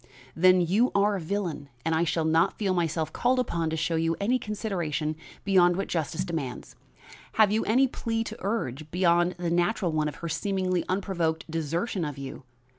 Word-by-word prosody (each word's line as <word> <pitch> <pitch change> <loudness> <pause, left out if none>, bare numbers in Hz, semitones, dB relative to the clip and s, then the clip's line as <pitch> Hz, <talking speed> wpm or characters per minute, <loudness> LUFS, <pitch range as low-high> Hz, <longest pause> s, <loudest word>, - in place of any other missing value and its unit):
"Then, 185 +2 +5
you 200 +9 +2
are 200 +1 +3
a - - -5
villain! 165 -5 -3 0.2
and 165 - +1
I 160 +2 +2
shall 165 0 0
not 160 +1 +2
feel 195 -3 0
myself 160 -3 -1
called 250 +2 +2
upon 170 -10 0
to 160 - -2
show 165 +1 0
you 165 0 +1
any 240 +6 +1
consideration 175 -8 -2 0.3
beyond 180 -3 +5
what 195 - -2
justice 165 +2 -2
demands. 155 -8 -5 0.6
Have 215 -2 +5
you 220 +1 +1
any 255 +5 +4
plea 225 -2 -2
to - - -7
urge 155 - -3
beyond 175 0 +2
the 175 -1 -2
natural 175 +1 +1
one 155 -1 0
of 150 - -5
her 170 - -6
seemingly 185 0 0
unprovoked 180 -4 -1
desertion 165 +5 -1
of 145 -2 -4
you? 140 0 -7
175 Hz, 185 wpm, -27 LUFS, 160-200 Hz, 0.6 s, Then